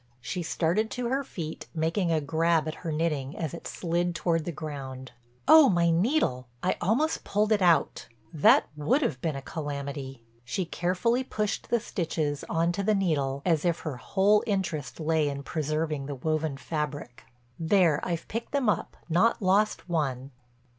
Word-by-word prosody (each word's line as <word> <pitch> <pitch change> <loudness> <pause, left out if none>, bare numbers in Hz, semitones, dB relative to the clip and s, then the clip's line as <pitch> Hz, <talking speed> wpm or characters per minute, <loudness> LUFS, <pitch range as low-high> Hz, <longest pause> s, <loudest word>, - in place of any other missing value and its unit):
She 125 +9 -4
started 175 +6 0
to 245 +2 -3
her 270 +2 0
feet, 160 - -7
making 165 +3 0
a 160 - +3
grab 160 +2 +1
at 155 - -2
her 165 - -3
knitting 150 -3 -1
as 160 -2 -3
it 170 - -7
slid 175 0 -1
toward 165 -2 0
the 175 - -2
ground. 135 -4 -7 0.4
"Oh, 310 -2 +9
my 170 -2 +3
needle! 170 - +1 0.2
I 185 - +2
almost 260 - +1
pulled 210 +2 0
it 210 -2 +3
out. 175 -2 +2 0.3
That 150 - +5
would 155 - +1
have 140 - -1
been 160 -4 -1
a 135 - -6
calamity." 140 -4 -5 0.2
She 130 +9 -2
carefully 185 +9 0
pushed 215 -4 -3
the 235 - +3
stitches 160 -8 -2
on 165 0 +1
to 200 - -2
the 210 +2 +2
needle 140 -8 0
as 165 -4 +2
if 170 -2 0
her 150 -6 -4
whole 200 +9 +3
interest 185 -10 -2
lay 155 -1 +1
in 140 0 -5
preserving 155 -2 -2
the 145 - -4
woven 155 +1 -1
fabric. 145 -5 -4 0.4
"There 165 -3 +3
I've 170 -2 -3
picked 230 +5 -5
them 275 -6 +2
up, 195 - -1
not 180 +9 +3
lost 205 +1 +2
one." 140 -6 -2
165 Hz, 170 wpm, -28 LUFS, 145-195 Hz, 0.4 s, Oh